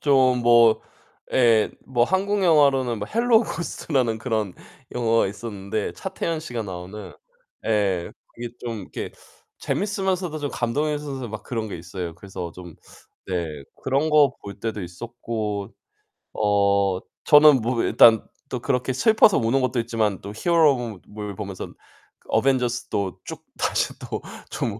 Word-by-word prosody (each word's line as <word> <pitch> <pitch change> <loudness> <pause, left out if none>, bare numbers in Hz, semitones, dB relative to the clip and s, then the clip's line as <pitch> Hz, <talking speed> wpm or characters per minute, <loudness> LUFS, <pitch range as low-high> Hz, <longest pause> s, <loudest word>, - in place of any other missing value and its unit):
좀 130 -3 +4
뭐 120 -1 +6 0.5
예 115 -4 +4
뭐 120 -2 +2
한국영화로는 155 - +3
뭐 105 - -3
헬로우 230 0 +4
고스트라는 130 - -1
그런 110 -6 -2 0.4
영화가 115 -1 +2
있었는데 100 0 -4
차태현씨가 160 -10 -4
나오는 95 +2 -8 0.5
예 100 -5 +1 0.2
그게 120 0 -5
좀 115 -3 -4
이렇게 - - -6 0.5
재밌으면서도 190 -5 -1
좀 145 -2 -3
감동이면서 140 +1 -2
막 105 -2 -7
그런 115 -2 -4
게 100 - -5
있어요. 85 0 -6
그래서 90 -1 -7
좀 90 -2 -11 0.5
네 80 -6 -3 0.2
그런 135 +4 +1
거 150 -3 +4
볼 100 0 -10
때도 110 -2 -3
있었고 105 +1 -5 0.6
어 100 -2 +2 0.2
저는 150 -3 +7
뭐 115 +1 0
일단 110 -2 +6 0.2
또 125 - -4
그렇게 130 +1 -1
슬퍼서 220 - +5
우는 115 +4 +2
것도 130 -1 0
있지만 110 -4 -1
또 100 - -7
히어로무 135 - +2
물 105 -1 -6
보면선 100 -2 -6 0.5
그 - - -29
어벤져스도 120 -5 0
쭉 - - -8
다시 - - 0
또 - - -5 0.4
좀 110 -1 -2
115 Hz, 280 characters per minute, -24 LUFS, 100-135 Hz, 0.6 s, 저는